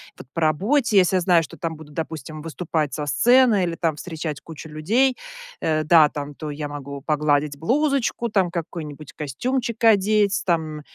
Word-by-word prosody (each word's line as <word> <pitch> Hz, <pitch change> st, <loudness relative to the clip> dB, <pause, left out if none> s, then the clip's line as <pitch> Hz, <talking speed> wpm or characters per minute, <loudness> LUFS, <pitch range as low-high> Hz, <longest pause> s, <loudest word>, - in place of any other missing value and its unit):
Вот -, -, -12 dB
по 165 Hz, -, -2 dB
работе, 205 Hz, -, +2 dB
если 185 Hz, -1 st, +4 dB
я 185 Hz, -, +2 dB
знаю, 175 Hz, -1 st, +4 dB
что 155 Hz, -, -9 dB
там 165 Hz, -2 st, -4 dB
будут, 150 Hz, -1 st, -13 dB
допустим, 155 Hz, -1 st, -6 dB
выступать 160 Hz, -2 st, -2 dB
со 150 Hz, -1 st, -4 dB
сцены, 235 Hz, -, +4 dB
или 170 Hz, -1 st, -1 dB
там 165 Hz, -2 st, -1 dB
встречать 155 Hz, -2 st, -5 dB
кучу 160 Hz, 0 st, -10 dB
людей, 225 Hz, +13 st, +1 dB, 0.4 s
э, 155 Hz, -1 st, +1 dB
да, 155 Hz, -1 st, +6 dB
там 145 Hz, 0 st, -6 dB
то 155 Hz, 0 st, -6 dB
я 145 Hz, 0 st, -5 dB
могу 140 Hz, -1 st, -7 dB
погладить 150 Hz, -1 st, 0 dB
блузочку, 255 Hz, -, 0 dB
там 190 Hz, -5 st, +1 dB
какой-нибудь 155 Hz, -3 st, -6 dB
костюмчик 235 Hz, -, -3 dB
одеть. 210 Hz, -1 st, +3 dB
Там, 160 Hz, -4 st, -1 dB
160 Hz, 170 wpm, -23 LUFS, 150-205 Hz, 0.4 s, да